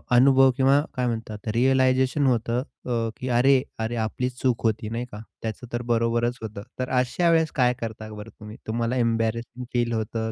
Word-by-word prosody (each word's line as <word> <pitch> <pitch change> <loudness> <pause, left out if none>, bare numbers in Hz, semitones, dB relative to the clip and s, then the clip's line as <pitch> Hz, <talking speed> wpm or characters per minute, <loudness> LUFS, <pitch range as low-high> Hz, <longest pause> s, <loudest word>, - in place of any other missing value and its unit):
अनुभव 135 +1 +6
किंवा 135 +2 +4
काय 125 -1 0
म्हणतात 110 -2 -5
रिअलायझेशन 130 +2 +3
होतं 120 0 +1 0.2
अ, 115 -2 -1
की 130 - -5
अरे! 130 +2 +4 0.2
अरे 115 +2 -2
आपली 125 +3 -2
चूक 125 -2 -1
होती 110 0 0
नाही 120 +2 -3
का? 105 - -8 0.2
त्याचं 115 +2 -5
तर 120 - -1
बरोबरच 120 +1 +1
होतं. 105 -2 -6 0.2
तर 130 - -2
अशा 170 +7 +1
वेळेस 160 -1 +3
काय 125 -2 +3
करता 110 -1 -5
बरं 105 +1 -9
तुम्ही? 105 0 -10
तुम्हाला 115 +2 -1
एम्बॅरसिंग 115 +1 -1
फील 120 -1 +1
होतं 110 0 -2
120 Hz, 175 wpm, -25 LUFS, 115-130 Hz, 0.2 s, अनुभव